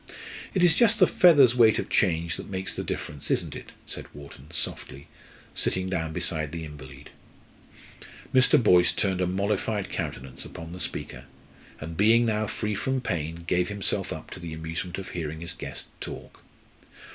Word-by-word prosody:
"It 185 - +3
is 170 -3 +6
just 225 0 +5
the - - +7
feather's 145 -9 +6
weight 115 -3 +6
of - - -2
change 85 -3 +1
that - - -8
makes 95 -1 -3
the - - -4
difference, 75 -1 -5
isn't - - 0
it?" - - -9
said - - -7
Wharton, 70 -1 -12
softly, 70 +2 -4 0.5
sitting 95 0 0
down 80 -3 -1
beside 80 -2 -1
the 80 0 -5
invalid. 70 -2 -11 1.2
Mr. 130 -1 +6
Boyce 90 -4 +5
turned 95 -2 0
a 90 - +2
mollified 100 +2 -1
countenance 65 0 -4
upon 80 0 -9
the 90 - -8
speaker, 65 -6 -4 0.5
and 80 +1 -7
being 115 +4 +5
now 110 -1 0
free 105 0 -2
from 130 +5 -1
pain, 85 -7 -3
gave 90 +2 +1
himself 100 -2 -1
up - - -7
to - - -7
the 85 -2 -6
amusement 80 +2 -4
of 95 - -6
hearing 80 -2 -5
his 85 0 -3
guest - - -6
talk. - - -8
90 Hz, 170 wpm, -27 LUFS, 80-105 Hz, 1.2 s, the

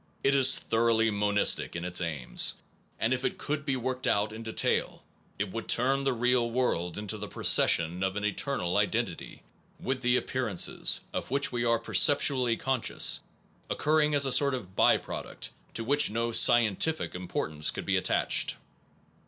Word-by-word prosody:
It 135 - +3
is 135 -2 +6
thoroughly 115 -1 +1
monistic 105 -2 +1
in 85 +1 -5
its 90 0 0
aims, 75 -7 -1 0.4
and 115 +3 0
if 130 +1 -3
it - - -2
could 150 0 -4
be 135 -3 -1
worked 130 0 -4
out 105 +1 0
in 110 - -8
detail 110 -1 -1 0.3
it 100 -1 -3
would 115 +2 -6
turn 135 +3 +1
the 135 -1 0
real 125 0 +1
world 100 -9 -2
into 105 +1 -5
the 105 - -6
procession 85 -2 +2
of 95 0 -2
an 105 0 -3
eternal 105 -4 -1
identity, - - -3 0.4
with 130 -1 -3
the 125 0 +3
appearances, 120 -10 0
of - - -4
which 140 +2 0
we 120 -1 -2
are 115 0 +2
perceptually 125 0 +2
conscious, 130 -3 +1 0.5
oc - - -3
curring 150 0 +2
as 140 -1 +3
a 135 - -1
sort 140 +1 +2
of 95 -6 -9
by - - +4
product - - -7 0.2
to 115 - -1
which 145 +4 +3
no 115 +2 -2
scientific 120 +7 +3
importance 80 -4 -2
should - - -7
be - - 0
attached. - - +1
115 Hz, 170 wpm, -28 LUFS, 105-130 Hz, 0.5 s, is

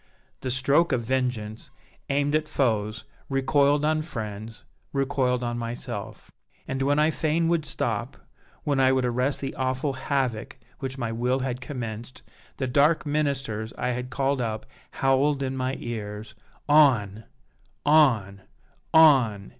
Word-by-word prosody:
The 130 - -4
stroke 140 +6 +2
of 125 -3 0
vengeance, 120 -3 -2 0.4
aimed 145 +1 +1
at 155 0 +1
foes, 110 -6 0 0.2
recoiled 140 +2 +2
on 155 0 +2
friends 110 -6 -7 0.3
recoiled 130 -2 0
on 120 0 -2
myself. 115 +1 -6 0.4
And 130 0 -3
when 140 +2 +2
I 155 +1 +4
fain 160 +1 0
would 170 -3 +1
stop, - - -2 0.5
when 145 -2 0
I 130 0 +5
would 130 -1 +1
arrest 125 +3 0
the 135 - -3
awful 130 +2 -1
havoc 130 -4 -2 0.2
which 135 0 -5
my 120 -3 -2
will 125 +3 0
had 130 -1 -3
commenced, 120 -2 -6 0.3
the 130 - -1
dark 145 +6 +3
ministers 135 -7 -1
I - - -1
had 125 0 -3
called 135 0 0
up 110 -2 -3 0.2
howled 135 +1 +1
in 130 0 -2
my 130 +1 -1
ears, 105 -2 -6 0.3
'On! 120 -9 +4 0.6
on! 120 -11 +4 0.5
on! 130 -11 +5
130 Hz, 140 wpm, -26 LUFS, 115-145 Hz, 0.6 s, I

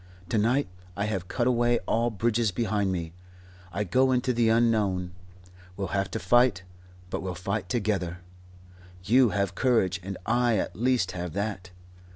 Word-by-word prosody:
To 110 - +1
night 120 +5 +2 0.3
I 100 - 0
have 95 -4 -3
cut 120 - -1
away 120 -1 +3
all 115 +1 +1
bridges 115 +1 +1
behind 100 -1 0
me. 85 -3 -4 0.6
I 105 - -1
go 130 +7 +2
into 125 0 +1
the 115 -1 +2
unknown. 105 -6 +1 0.6
We'll 100 -1 -3
have 100 -2 -1
to - - -3
fight, 110 0 +3 0.5
but - - -2
we'll 95 -1 -4
fight 95 +1 -3
together. 95 -6 -1 0.8
You 120 +5 +4
have 100 -2 -1
courage, 95 -5 +1
and 95 +1 -6
I 120 -1 +2
at 90 - -2
least 120 -3 +1
have 90 -2 -5
that. 100 -2 -3
105 Hz, 160 wpm, -27 LUFS, 95-120 Hz, 0.8 s, You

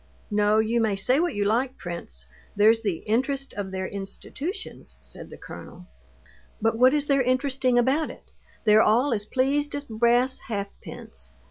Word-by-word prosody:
"No, 210 +1 +3
you 225 +2 +2
may 215 -3 +1
say 250 +8 +3
what 345 +1 0
you 205 0 0
like, 250 +5 0
prince, 115 - -7 0.3
there's 220 +2 +5
the 200 -7 -2
interest 265 +5 -1
of 200 -2 -4
their 190 0 -3
institutions," 200 - -7
said - - -12
the - - -11
colonel. 180 +1 -11 0.7
"But 225 +1 +1
what 255 +4 +5
is 295 -1 +1
there 275 -2 +3
interesting 255 0 +1
about 265 +6 +2
it? - - -11 0.4
They're 215 0 +6
all 240 +6 +3
as 205 -2 -1
pleased 280 +5 0
as 285 0 -5
brass 240 +2 +2
halfpence. 200 - -7
230 Hz, 160 wpm, -25 LUFS, 205-265 Hz, 0.7 s, They're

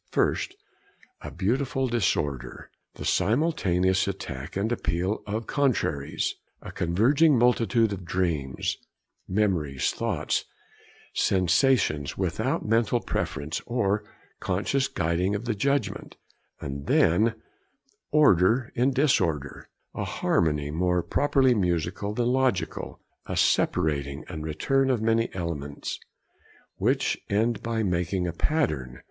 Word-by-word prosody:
First, - - 0 0.7
a - - -6
beautiful 130 +5 0
disorder: 75 - -2 0.2
the - - -7
simultaneous 95 - +2
attack 70 -7 -5
and 105 +4 -1
appeal 95 -3 -1
of 110 +3 -3
contraries, 125 - 0 0.3
a - - -9
converging 130 - +3
multitude 115 -2 +3
of 95 -2 -6
dreams, 85 -7 -1 0.5
memories, 85 -10 0
thoughts, - - -1 0.7
sensations, 90 - +2
without - - -1
mental 115 +1 +2
preference, 75 -8 -3
or 105 -4 0 0.4
conscious 120 +9 0
guiding 90 -4 0
of 105 +4 -4
the 115 - 0
judgment; 115 -3 -1 0.4
and 70 0 -6
then, 110 +7 +3 0.7
order 120 - +4
in 130 +3 +2
disorder, 95 - 0 0.2
a - - -3
harmony 75 -3 0
more 90 +2 +1
properly 130 - +3
musical 90 0 -1
than 120 - 0
logical, 125 -10 -1 0.3
a - - -3
separating 70 -1 +1
and 80 -4 -6
return 135 - +1
of 125 -3 +2
many 115 +1 +1
elements, 75 -5 -4 0.8
which - - +1
end 110 +2 +1
by 115 -1 -1
making 90 -1 0
a 85 - -3
pattern. 75 - -1
95 Hz, 110 wpm, -26 LUFS, 85-120 Hz, 0.8 s, order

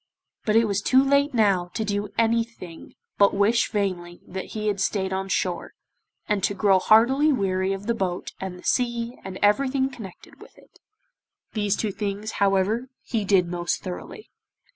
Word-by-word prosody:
But 215 - +1
it 230 0 +5
was 200 -2 -1
too 260 +5 +4
late 280 +1 +3
now 195 -5 +2
to 220 - -1
do 205 0 -2
anything 230 -7 -2 0.2
but 200 -1 +5
wish 210 +4 +2
vainly 180 -4 -3
that 190 +1 -7
he 215 - -3
had 205 -2 0
stayed 190 -2 -1
on 190 0 -3
shore, 180 -2 -2 0.5
and 210 -3 0
to 200 - +1
grow 195 -2 +4
heartily 260 +10 +4
weary 190 -6 0
of 195 +1 -4
the 235 - +1
boat 185 -5 -3
and 190 -2 -5
the - - -15
sea 235 -1 -1
and 190 -1 -7
everything 265 +5 +2
connected 210 -9 -12
with - - -15
it. - - -22 0.7
These 205 -2 0
two 215 - -2
things, 205 +2 -4
however, 200 +5 +1
he 225 -4 -2
did 190 -3 +3
most 175 0 -2
thoroughly. 190 - -8
205 Hz, 170 wpm, -24 LUFS, 190-230 Hz, 0.7 s, it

